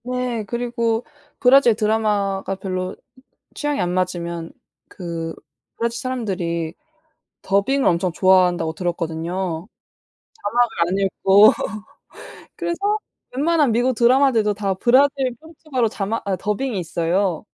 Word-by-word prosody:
네. 250 Hz, -2 st, -2 dB
그리고 235 Hz, 0 st, -1 dB, 0.3 s
브라질 250 Hz, -3 st, +6 dB
드라마가 205 Hz, -3 st, 0 dB
별로 185 Hz, -1 st, -4 dB, 0.6 s
취향이 295 Hz, -3 st, -2 dB
안 180 Hz, -1 st, 0 dB
맞으면 170 Hz, -2 st, -2 dB, 0.4 s
그 165 Hz, -3 st, -5 dB, 0.4 s
브라질 235 Hz, 0 st, -2 dB
사람들이 185 Hz, -10 st, -3 dB, 0.7 s
더빙을 225 Hz, +8 st, +2 dB
엄청 175 Hz, +1 st, +1 dB
좋아한다고 180 Hz, -3 st, +3 dB
들었거든요. 170 Hz, +1 st, -3 dB, 0.9 s
자막 240 Hz, -1 st, +2 dB, 0.2 s
안 185 Hz, +2 st, -1 dB
읽고 195 Hz, +2 st, +5 dB, 1.1 s
그래서 340 Hz, -1 st, -3 dB, 0.6 s
웬만한 300 Hz, -2 st, +2 dB
미국 245 Hz, +3 st, +2 dB
드라마들도 235 Hz, -3 st, +3 dB
다 200 Hz, -2 st, -1 dB
브라질 260 Hz, +4 st, +3 dB
포르투갈어 310 Hz, -7 st, -2 dB
자막 210 Hz, +1 st, -3 dB
아 190 Hz, -, +1 dB
더빙이 210 Hz, +3 st, -2 dB
있어요. 175 Hz, +1 st, -1 dB
205 Hz, 270 characters per minute, -21 LUFS, 180-245 Hz, 1.1 s, 브라질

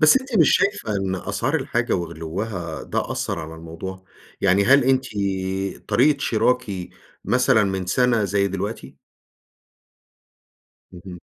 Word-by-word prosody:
بس 155 Hz, +10 st, +7 dB
أنتِ 260 Hz, -5 st, -2 dB
مش 160 Hz, -5 st, +6 dB
شايفة 200 Hz, -, 0 dB
إن 95 Hz, -1 st, -1 dB
أسعار 90 Hz, -, -2 dB
الحاجة -, -, 0 dB
وغلوّها 85 Hz, 0 st, -4 dB
ده -, -, -3 dB
أثّر -, -, -3 dB
على 80 Hz, 0 st, -7 dB
الموضوع، 85 Hz, +4 st, -8 dB, 0.4 s
يعني 100 Hz, +1 st, +3 dB
هل 140 Hz, +2 st, +5 dB
أنتِ 130 Hz, 0 st, +2 dB, 0.8 s
طريقة 140 Hz, +3 st, +3 dB
شراكِ 125 Hz, +1 st, +1 dB, 0.6 s
مثلًا 105 Hz, -, +3 dB
من 95 Hz, -2 st, -2 dB
سنة 115 Hz, +2 st, +2 dB
زي 100 Hz, 0 st, +1 dB
دلوقتي؟ 100 Hz, +4 st, -5 dB, 2.0 s
اهم. 90 Hz, 0 st, -10 dB
100 Hz, 120 wpm, -22 LUFS, 90-125 Hz, 2.0 s, بس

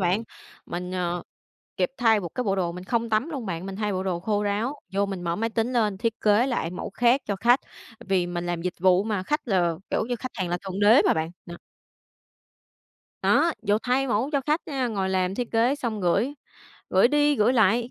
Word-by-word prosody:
bạn. 185 Hz, +4 st, +1 dB, 0.4 s
Mình, 180 Hz, +1 st, -5 dB
ờ, 175 Hz, -1 st, -2 dB, 0.5 s
kịp 180 Hz, -, +1 dB
thay 225 Hz, -3 st, +4 dB
một 175 Hz, -, -5 dB
cái 250 Hz, -, -2 dB
bộ 195 Hz, -2 st, 0 dB
đồ, 175 Hz, -3 st, -1 dB
mình 180 Hz, +1 st, -8 dB
không 230 Hz, +3 st, -1 dB
tắm 220 Hz, +7 st, +1 dB
luôn 270 Hz, -8 st, -5 dB
bạn, 175 Hz, -1 st, -4 dB
mình 195 Hz, -1 st, -6 dB
thay 210 Hz, 0 st, -1 dB
bộ 185 Hz, 0 st, -2 dB
đồ 180 Hz, -3 st, -2 dB
khô 205 Hz, +2 st, 0 dB
ráo, 210 Hz, +7 st, -1 dB, 0.2 s
vô 200 Hz, +1 st, +1 dB
mình 195 Hz, -3 st, -5 dB
mở 170 Hz, -1 st, -1 dB
máy 225 Hz, +4 st, -1 dB
tính 230 Hz, +2 st, -1 dB
lên 215 Hz, -5 st, +1 dB
thiết 230 Hz, 0 st, 0 dB
kế 210 Hz, +4 st, +4 dB
lại 240 Hz, -10 st, -1 dB
mẫu 180 Hz, -, -6 dB
khác 240 Hz, +6 st, +3 dB
cho 200 Hz, -, -1 dB
khách. 240 Hz, +6 st, +4 dB, 0.5 s
Vì 185 Hz, -2 st, +2 dB
mình 175 Hz, 0 st, -4 dB
làm 175 Hz, -1 st, -2 dB
dịch 180 Hz, 0 st, -2 dB
vụ 185 Hz, +1 st, +4 dB
mà, 210 Hz, -4 st, -1 dB
khách 295 Hz, +7 st, -2 dB
là, 175 Hz, -5 st, +2 dB, 0.2 s
kiểu -, -, 0 dB
như, 245 Hz, -, -1 dB
khách 255 Hz, +3 st, -6 dB
hàng 185 Hz, -5 st, -2 dB
là 175 Hz, +1 st, -1 dB
thượng 190 Hz, +1 st, -4 dB
đế 215 Hz, +6 st, +6 dB
mà -, -, +4 dB
bạn, 160 Hz, +1 st, -2 dB, 0.2 s
đó. 170 Hz, -1 st, -8 dB, 1.7 s
Đó, 335 Hz, -, +3 dB
vồ 210 Hz, -1 st, +2 dB
thay 255 Hz, +2 st, +1 dB
mẫu 235 Hz, +5 st, 0 dB
cho 280 Hz, -, +2 dB
khách 300 Hz, +5 st, 0 dB
nha, 270 Hz, -4 st, -1 dB
ngồi 200 Hz, -5 st, -1 dB
làm 185 Hz, 0 st, 0 dB
thiết 245 Hz, +2 st, -3 dB
kế 235 Hz, +4 st, +3 dB
xong 235 Hz, -7 st, -3 dB
gửi, 195 Hz, +10 st, +1 dB, 0.6 s
gửi 190 Hz, +5 st, +5 dB
đi 295 Hz, +1 st, +3 dB
gửi 215 Hz, +2 st, +3 dB
lại, 230 Hz, +1 st, +3 dB
210 Hz, 230 wpm, -25 LUFS, 185-240 Hz, 1.7 s, đế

